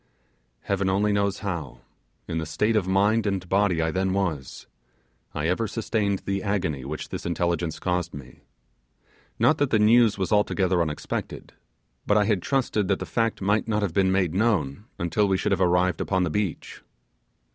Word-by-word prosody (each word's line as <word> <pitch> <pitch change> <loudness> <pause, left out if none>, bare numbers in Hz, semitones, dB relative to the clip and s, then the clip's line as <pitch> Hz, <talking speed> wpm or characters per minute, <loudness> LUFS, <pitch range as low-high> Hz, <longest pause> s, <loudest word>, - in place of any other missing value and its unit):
Heaven 100 -1 -1
only 100 +2 +2
knows 100 -1 0
how, 85 -8 -4 0.5
in 80 - -2
the 80 - -3
state 105 +8 0
of 100 -4 +1
mind 105 +3 +2
and 95 -3 -2
body 95 -3 +2
I 80 - 0
then 95 +2 0
was, 85 -9 -3 0.7
I 75 - -1
ever 100 +6 0
sustained 105 -3 -1
the 100 0 -1
agony 90 -10 -2
which 75 +4 -6
this - - -5
intelligence 85 -1 -1
caused 90 -2 -1
me; 65 -4 -11 1.0
not 155 - +3
that 145 -2 +2
the 110 - +3
news 110 +1 +4
was 95 -2 -2
altogether 95 -4 +2
unexpected; 75 -3 -4 0.5
but 105 - +4
I 105 - +3
had 100 -4 +1
trusted 120 -6 0
that 100 -1 +1
the - - -5
fact 115 -3 -1
might 105 +3 +1
not 105 -1 0
have 95 -5 -2
been 95 0 +2
made 95 -4 +1
known 100 -5 0
until 85 +5 +1
we 95 -1 +2
should - - -1
have 95 -1 +1
arrived 90 -1 +2
upon 95 -2 0
the 85 - -1
beach. 100 -3 -3
95 Hz, 180 wpm, -25 LUFS, 85-105 Hz, 1.0 s, news